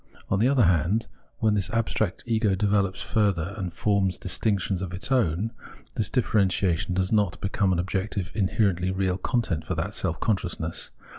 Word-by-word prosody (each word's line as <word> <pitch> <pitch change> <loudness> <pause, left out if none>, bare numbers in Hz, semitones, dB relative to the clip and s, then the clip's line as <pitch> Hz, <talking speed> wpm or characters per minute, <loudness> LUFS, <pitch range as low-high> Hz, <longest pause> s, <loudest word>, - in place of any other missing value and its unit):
On 95 - +1
the 115 - +4
other 135 -3 +4
hand, 90 +6 +2 0.3
when 110 -2 +2
this 100 -3 0
abstract 110 -3 -1
ego 110 -4 +2
develops 100 -1 +1
further 100 -4 0
and 90 -2 -4
forms 100 0 +1
distinctions 95 0 -1
of 90 -2 -4
its 100 +9 -1
own, 110 -4 +1 0.4
this 110 -5 0
differentiation 95 -6 +1
does 95 0 +1
not 105 -5 +1
become 95 0 0
an 90 - +1
objective 95 +1 -2
inherently 100 -3 +1
real 95 0 0
content 95 -7 -1
for 95 - -3
that 85 +6 -2
self 85 -5 -1
consciousness. 85 -6 -1
95 Hz, 160 wpm, -26 LUFS, 90-105 Hz, 0.4 s, the